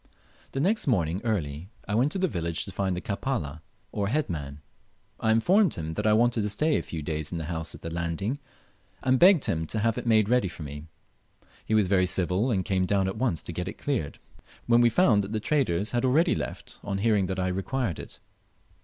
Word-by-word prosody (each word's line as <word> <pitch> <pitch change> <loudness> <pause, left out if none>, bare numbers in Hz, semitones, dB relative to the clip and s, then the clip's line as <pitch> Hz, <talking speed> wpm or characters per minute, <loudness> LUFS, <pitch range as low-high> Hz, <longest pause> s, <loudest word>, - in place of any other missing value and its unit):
The 135 - -2
next 195 +7 +1
morning 90 - +1
early 85 -7 -2 0.2
I 105 - -2
went 125 +7 +2
to - - -2
the 190 0 +1
village 85 - -2
to 95 - -8
find 95 -2 -1
the - - -3
"Kapala," 100 - -3 0.3
or 100 -1 -1
head 145 +1 0
man. 70 -3 -5 0.6
I 110 - 0
informed 180 - +3
him 80 -1 -4
that 105 +5 -1
I 105 - +5
wanted 120 +1 +3
to 105 - -1
stay 150 +10 +1
a - - +1
few 80 -3 -6
days 75 0 -3
in 85 - -3
the 80 - -3
house 80 0 -4
at - - -14
the 85 - -5
landing, 85 - -2 0.6
and 130 -1 +3
begged 180 -4 +6
him 80 0 -1
to 110 - -1
have 110 +1 +1
it - - -7
made 110 -3 +4
ready 125 -3 +2
for 85 -2 -8
me. 75 +2 -8 0.8
He 110 - +2
was 105 -2 +4
very 95 -1 +2
civil, 90 +6 +1
and 95 -6 0
came 95 -1 +1
down 100 -1 +2
at 95 - -4
once 110 - 0
to 85 - -6
get 90 +2 -4
it 95 - -6
cleared, 130 - -2 0.5
when 120 0 +4
we 120 - +5
found 115 - +4
that 100 +3 -6
the 110 - 0
traders 105 - 0
had 120 0 0
already 150 +7 +3
left, - - -6
on 100 -1 -2
hearing 105 -2 +2
that 95 0 -3
I 90 0 0
required 95 - -2
it. - - -9
100 Hz, 225 wpm, -27 LUFS, 85-120 Hz, 0.8 s, begged